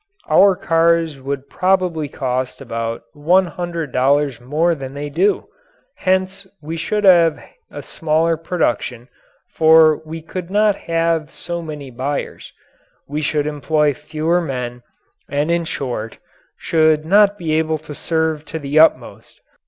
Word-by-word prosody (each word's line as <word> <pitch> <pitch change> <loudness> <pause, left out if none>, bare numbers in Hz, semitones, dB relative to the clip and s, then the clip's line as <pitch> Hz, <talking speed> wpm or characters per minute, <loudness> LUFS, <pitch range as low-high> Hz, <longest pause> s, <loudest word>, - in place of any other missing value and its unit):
Our 195 -1 +6
cars 165 -3 +1
would 135 +1 -5
probably 180 -5 0
cost 130 -1 -3
about 115 -3 -4
one 175 +6 +3
hundred 170 -4 -5
dollars 135 0 +1
more 155 +7 +1
than 135 -3 -7
they 145 0 -5
do; 185 +7 +1 0.5
hence 190 +1 -1
we 160 +2 -6
should 210 +6 -2
have 170 -5 +5 0.3
a 145 - -8
smaller 160 +1 0
production, 130 - -2 0.4
for 160 -1 +5
we 160 0 -8
could 180 +1 -6
not 210 +1 +3
have 165 -3 -1
so 170 +3 -5
many 150 -4 -8
buyers; 135 +4 -4 0.6
we 150 +2 -3
should 150 -1 0
employ 150 0 +1
fewer 155 +4 -1
men, 125 -5 -5 0.5
and 145 +3 0
in 170 0 0
short, 120 -7 -4 0.4
should 155 -1 +2
not 205 +3 +4
be 160 -4 -2
able 160 0 +1
to 150 -1 -10
serve 160 0 -1
to 160 - -6
the 145 0 0
utmost. 160 - +1
155 Hz, 135 wpm, -19 LUFS, 145-170 Hz, 0.6 s, Our